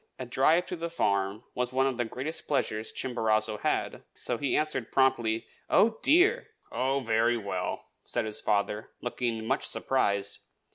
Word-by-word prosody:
A 130 Hz, -, -5 dB
drive 155 Hz, +8 st, +3 dB
to -, -, -4 dB
the 170 Hz, 0 st, -4 dB
farm 100 Hz, -8 st, 0 dB
was 125 Hz, 0 st, -1 dB
one 130 Hz, +1 st, +2 dB
of 135 Hz, -2 st, 0 dB
the 120 Hz, -, 0 dB
greatest 130 Hz, +8 st, -5 dB
pleasures 110 Hz, -6 st, -1 dB
Chimborazo 110 Hz, -3 st, 0 dB
had, -, -, -1 dB
so 120 Hz, -, -1 dB
he 140 Hz, -, +1 dB
answered 150 Hz, -6 st, -1 dB
promptly, 120 Hz, -4 st, +2 dB, 0.2 s
"Oh, 220 Hz, +1 st, +4 dB
dear!" 405 Hz, -, +4 dB, 0.2 s
"Oh, 130 Hz, +3 st, 0 dB
very 115 Hz, 0 st, +2 dB
well!" 100 Hz, -4 st, -3 dB, 0.2 s
said 120 Hz, -2 st, -1 dB
his 110 Hz, 0 st, -3 dB
father, 105 Hz, 0 st, 0 dB
looking 120 Hz, -2 st, -2 dB
much 135 Hz, +5 st, 0 dB
surprised. 100 Hz, -6 st, 0 dB
120 Hz, 155 wpm, -29 LUFS, 110-135 Hz, 0.2 s, Oh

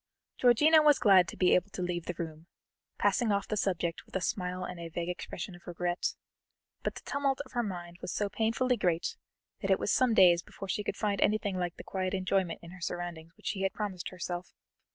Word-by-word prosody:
Georgiana 300 Hz, +6 st, +6 dB
was 295 Hz, -2 st, +6 dB
glad 190 Hz, -5 st, +6 dB
to -, -, -8 dB
be 180 Hz, -, +4 dB
able 180 Hz, +2 st, +3 dB
to 185 Hz, -, -4 dB
leave 175 Hz, -1 st, -2 dB
the 175 Hz, -, -3 dB
room, 160 Hz, 0 st, -6 dB, 0.5 s
passing 240 Hz, -4 st, +2 dB
off 200 Hz, 0 st, 0 dB
the 215 Hz, -, -1 dB
subject 175 Hz, -4 st, -1 dB
with -, -, -16 dB
a -, -, +2 dB
smile 180 Hz, 0 st, -2 dB
and 180 Hz, -1 st, -6 dB
a 170 Hz, -1 st, -6 dB
vague 170 Hz, +1 st, -3 dB
expression 180 Hz, +1 st, -5 dB
of 175 Hz, -, -15 dB
regret, 175 Hz, 0 st, -1 dB, 0.7 s
but -, -, -2 dB
the -, -, -9 dB
tumult 280 Hz, -1 st, 0 dB
of -, -, -17 dB
her 240 Hz, -, 0 dB
mind 175 Hz, -5 st, -6 dB
was -, -, -4 dB
so 205 Hz, -, 0 dB
painfully 230 Hz, +4 st, +1 dB
great 175 Hz, -5 st, 0 dB, 0.5 s
that -, -, -2 dB
it -, -, +5 dB
was -, -, -1 dB
some 250 Hz, -3 st, +3 dB
days 175 Hz, -4 st, +7 dB
before 195 Hz, -, -9 dB
she 205 Hz, +2 st, -1 dB
could 200 Hz, -, -3 dB
find 205 Hz, -2 st, 0 dB
anything 205 Hz, -2 st, +2 dB
like 180 Hz, -1 st, -2 dB
the -, -, -9 dB
quiet 185 Hz, 0 st, -2 dB
enjoyment 185 Hz, -2 st, 0 dB
in 170 Hz, -, -10 dB
her 180 Hz, 0 st, -12 dB
surroundings 175 Hz, -2 st, -4 dB
which -, -, -21 dB
she 195 Hz, -, -2 dB
had 195 Hz, -1 st, +1 dB
promised 195 Hz, -4 st, -4 dB
herself. 180 Hz, 0 st, -5 dB
185 Hz, 220 wpm, -31 LUFS, 175-210 Hz, 0.7 s, days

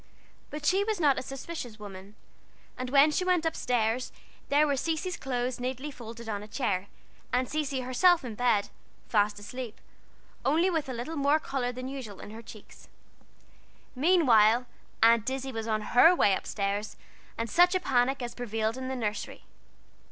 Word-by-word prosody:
But 300 Hz, 0 st, -6 dB
she 380 Hz, +6 st, +3 dB
was 430 Hz, -2 st, -2 dB
not 285 Hz, -5 st, +3 dB
a -, -, -4 dB
suspicious 265 Hz, -3 st, -7 dB
woman; 200 Hz, -1 st, -10 dB, 0.6 s
and 255 Hz, 0 st, -5 dB
when 280 Hz, +3 st, +6 dB
she 335 Hz, -, 0 dB
went 360 Hz, -3 st, +2 dB
up 325 Hz, -, 0 dB
stairs 245 Hz, 0 st, 0 dB, 0.4 s
there 290 Hz, +2 st, +4 dB
were 285 Hz, -2 st, +1 dB
Cecy's 330 Hz, +5 st, -2 dB
clothes 250 Hz, -2 st, -3 dB
neatly 260 Hz, +4 st, -4 dB
folded 235 Hz, -2 st, -10 dB
on 205 Hz, -2 st, -3 dB
a 210 Hz, -, -9 dB
chair, 205 Hz, -5 st, -1 dB, 0.4 s
and 250 Hz, +1 st, +1 dB
Cecy 285 Hz, -3 st, -2 dB
herself 300 Hz, +6 st, +3 dB
in 235 Hz, -, -5 dB
bed, 215 Hz, -3 st, +1 dB, 0.4 s
fast 210 Hz, -1 st, +2 dB
asleep, 230 Hz, +2 st, -7 dB, 0.6 s
only 330 Hz, +6 st, +3 dB
with 320 Hz, -5 st, -1 dB
a -, -, -3 dB
little 250 Hz, +7 st, -5 dB
more 285 Hz, +2 st, +3 dB
color 265 Hz, -5 st, -2 dB
than 255 Hz, +1 st, -6 dB
usual 260 Hz, -7 st, -7 dB
in -, -, -9 dB
her 225 Hz, +1 st, -9 dB
cheeks. 215 Hz, -2 st, -14 dB, 1.1 s
Meantime, 250 Hz, -, +4 dB, 0.4 s
Aunt 230 Hz, +1 st, +5 dB
Izzie 265 Hz, 0 st, -4 dB
was 225 Hz, -2 st, -5 dB
on 215 Hz, -1 st, 0 dB
her 325 Hz, +9 st, +7 dB
way 200 Hz, -, +4 dB
up -, -, -3 dB
stairs, 205 Hz, +1 st, -2 dB, 0.4 s
and 230 Hz, -, -2 dB
such 355 Hz, -, +4 dB
a -, -, +3 dB
panic 260 Hz, -3 st, +1 dB
as 240 Hz, -, -5 dB
prevailed 225 Hz, -1 st, -2 dB
in 260 Hz, -, -5 dB
the 265 Hz, -, -3 dB
nursery! 215 Hz, -4 st, -4 dB
250 Hz, 175 wpm, -28 LUFS, 225-290 Hz, 1.1 s, her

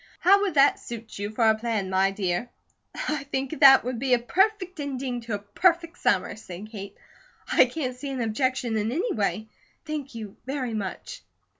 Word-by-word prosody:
How 395 Hz, +2 st, +5 dB
would 390 Hz, -6 st, -1 dB
that 275 Hz, 0 st, +5 dB
suit 225 Hz, -3 st, -8 dB
you 205 Hz, 0 st, -3 dB
for 220 Hz, +1 st, +1 dB
a 220 Hz, -, +6 dB
plan, 220 Hz, -4 st, -2 dB
my 190 Hz, +1 st, +3 dB
dear?" 195 Hz, +3 st, -2 dB, 0.6 s
"I 300 Hz, -2 st, -1 dB
think 275 Hz, +2 st, -3 dB
that 270 Hz, -2 st, +8 dB
would 245 Hz, -1 st, -3 dB
be 255 Hz, -1 st, +3 dB
a -, -, +1 dB
perfect 370 Hz, -, 0 dB
ending 265 Hz, -3 st, -3 dB
to 230 Hz, -2 st, -3 dB
a -, -, -2 dB
perfect 335 Hz, -, 0 dB
summer," 190 Hz, -1 st, +1 dB
said 210 Hz, 0 st, -9 dB
Kate. 200 Hz, -2 st, -8 dB, 0.5 s
"I -, -, +6 dB
can't 255 Hz, -6 st, -4 dB
see 280 Hz, +3 st, -6 dB
an 265 Hz, -1 st, -4 dB
objection 235 Hz, 0 st, 0 dB
in 215 Hz, +1 st, -1 dB
any 380 Hz, -, -1 dB
way. 215 Hz, +1 st, -1 dB, 0.4 s
Thank 295 Hz, -5 st, -5 dB
you 215 Hz, -3 st, -8 dB
very 265 Hz, -4 st, -3 dB
much." 215 Hz, -, -5 dB
245 Hz, 185 wpm, -26 LUFS, 215-285 Hz, 0.6 s, that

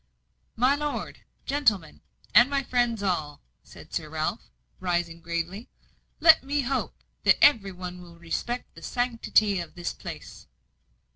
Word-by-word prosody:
"My 255 Hz, +4 st, +4 dB
lord, 295 Hz, 0 st, -4 dB, 0.3 s
gentlemen, 210 Hz, -, 0 dB, 0.3 s
and 240 Hz, +3 st, +7 dB
my 280 Hz, -1 st, 0 dB
friends 240 Hz, -4 st, 0 dB
all," 155 Hz, -6 st, -1 dB, 0.2 s
said -, -, -15 dB
Sir -, -, -3 dB
Ralph, -, -, -3 dB, 0.3 s
rising 175 Hz, -2 st, -2 dB
gravely, 170 Hz, +6 st, -4 dB, 0.5 s
"let 320 Hz, -3 st, +7 dB
me 285 Hz, +2 st, 0 dB
hope 265 Hz, +1 st, -2 dB, 0.3 s
that -, -, +5 dB
every 210 Hz, -9 st, +5 dB
one 180 Hz, 0 st, -7 dB
will 170 Hz, -1 st, -14 dB
respect 205 Hz, +9 st, -4 dB
the -, -, -13 dB
sanctity 230 Hz, -5 st, +1 dB
of 170 Hz, -2 st, -7 dB
this 175 Hz, 0 st, -4 dB
place." -, -, -9 dB
205 Hz, 135 wpm, -27 LUFS, 175-255 Hz, 0.5 s, and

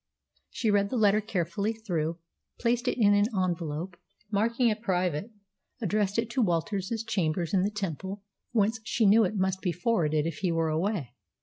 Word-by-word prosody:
She 220 Hz, -3 st, 0 dB
read 200 Hz, -1 st, +2 dB
the 250 Hz, -, -1 dB
letter 210 Hz, -1 st, +4 dB
carefully 200 Hz, +1 st, -1 dB
through, 170 Hz, -7 st, -2 dB, 0.4 s
placed 240 Hz, +1 st, +1 dB
it -, -, +1 dB
in 205 Hz, -2 st, +5 dB
an 205 Hz, +1 st, +4 dB
envelope, 170 Hz, -1 st, -2 dB, 0.3 s
and, 210 Hz, -, -39 dB
marking 235 Hz, +4 st, +2 dB
it 215 Hz, 0 st, -2 dB
private, 180 Hz, -2 st, 0 dB, 0.5 s
addressed 210 Hz, -3 st, 0 dB
it 230 Hz, 0 st, +1 dB
to 260 Hz, -, +1 dB
Walter's 190 Hz, 0 st, 0 dB, 0.2 s
chambers 170 Hz, -4 st, -1 dB
in 190 Hz, -, +4 dB
the 195 Hz, -, +1 dB
Temple, 195 Hz, -1 st, -5 dB, 0.3 s
whence 220 Hz, 0 st, +2 dB
she 220 Hz, +1 st, +1 dB
knew 215 Hz, +2 st, +6 dB
it 190 Hz, -, -2 dB
must 190 Hz, 0 st, 0 dB
be 180 Hz, -, 0 dB
forwarded 165 Hz, -5 st, +1 dB
if 165 Hz, -3 st, -3 dB
he 185 Hz, -3 st, 0 dB
were 165 Hz, -1 st, +1 dB
away. 160 Hz, -, -1 dB
200 Hz, 180 wpm, -28 LUFS, 170-215 Hz, 0.5 s, knew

